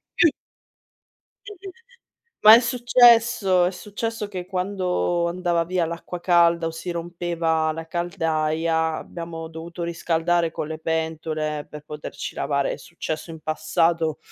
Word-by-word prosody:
più 335 -4 +4 2.1
Ma 215 +1 +10
è - - +4
successo. 235 -6 +4
È - - +1
successo 210 +3 -5
che 185 -3 -6
quando 180 -2 -1
andava 175 -1 0
via 175 0 0
l'acqua 170 +1 -6
calda 170 -2 +3
o - - -1
si 170 +2 -6
rompeva 170 -2 -1
la 165 +1 -6
caldaia, 160 -1 0
abbiamo 165 -1 -7
dovuto 170 +2 -7
riscaldare 170 0 0
con 155 - -4
le 160 0 -6
pentole 160 -2 -2
per 150 -1 -9
poterci 150 0 -7
lavare. 140 -1 0
È - - -5
successo 165 -1 -6
in 160 - -8
passato, 160 0 0
170 Hz, 125 wpm, -23 LUFS, 160-180 Hz, 2.1 s, Ma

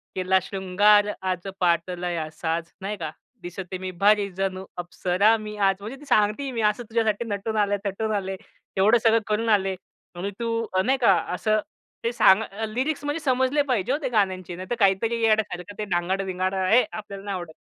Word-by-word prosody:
केला 190 0 +2
शृंगार 205 +2 +3
आज 185 0 -2
घातलाया 175 -1 0
साज. 165 +1 -3
नाही 205 +2 -3
का, 160 -4 -4 0.3
दिसते 185 +1 -6
मी 185 0 -4
भारी, 205 0 +4
जणू 190 0 -3
अप्सरा 180 +4 +2
मी 210 -1 -7
आज 195 -1 +3
म्हणजे 225 +6 -6
ती 295 - -13
सांगते 215 +5 +1
मी 230 - -2
असं 210 +2 +1
तुझ्यासाठी 225 -1 0
नटून 210 +2 -3
आले, 205 -1 +2
तटून 215 +3 -2
आले. 195 -1 -2 0.4
एवढं 215 +5 +5
सगळं 225 0 +5
करून 220 +2 0
आले. 195 -2 +3 0.4
म्हणजे 195 +3 -4
तू, 230 -1 -1 0.2
अ, 185 - +3
नाही 265 +3 +2
का, 195 -5 +6 0.2
असं 215 +2 +1 0.4
ते 235 - 0
सांग. 200 -2 +6 0.3
लिरिक्स 280 +5 -1
म्हणजे 290 +3 -1
समजले 260 0 +2
पाहिजे 235 0 0
हो - - +1
ते 260 - 0
गाण्यांचे, 185 -6 0
नाहीतर 185 +6 -4
काहीतरी 220 +4 +2
येड्यासारखं 205 -3 0
ते 210 - -2
धांगाड-विंगाड, 185 +1 -1
अय्ये! 190 +6 +4
आपल्याला 200 -2 -8
नाही 200 - -2
आवडत. 175 -3 -8
200 Hz, 175 wpm, -25 LUFS, 185-220 Hz, 0.4 s, का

